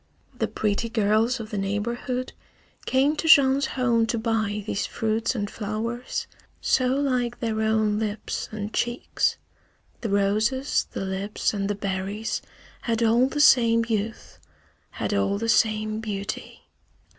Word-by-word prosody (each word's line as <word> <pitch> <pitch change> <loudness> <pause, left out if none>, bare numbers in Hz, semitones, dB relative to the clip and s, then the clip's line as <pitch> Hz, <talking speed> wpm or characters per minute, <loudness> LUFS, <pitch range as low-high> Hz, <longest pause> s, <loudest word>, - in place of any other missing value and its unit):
The - - -1
pretty 215 +2 -1
girls 225 +3 +2
of 220 0 -7
the 210 - -2
neighborhood 235 +6 -2 0.5
came 275 +4 +3
to 325 - -2
Jean's 275 -2 +6
home 235 -3 +2
to 230 - -1
buy 220 -2 -1
these 205 - -2
fruits 225 +2 -1
and 205 -3 -1
flowers, 225 +4 -4 0.3
so 255 -1 +2
like 250 -4 0
their 220 -2 -1
own 220 -1 +2
lips 215 -1 -3
and 215 0 -5
cheeks. 240 +1 0 0.6
The 225 - -2
roses, 215 +7 +1
the 195 - -3
lips, 195 +3 -2
and 200 -1 -2
the 205 - 0
berries 200 +2 -3 0.4
had 230 -2 0
all 235 +3 +4
the 295 +2 -4
same 230 -5 +5
youth, 220 0 -3 0.5
had - - -3
all 100 - +1
the 230 +2 -3
same 215 -1 +2
beauty. 200 -3 -5
220 Hz, 140 wpm, -25 LUFS, 210-240 Hz, 0.6 s, Jean's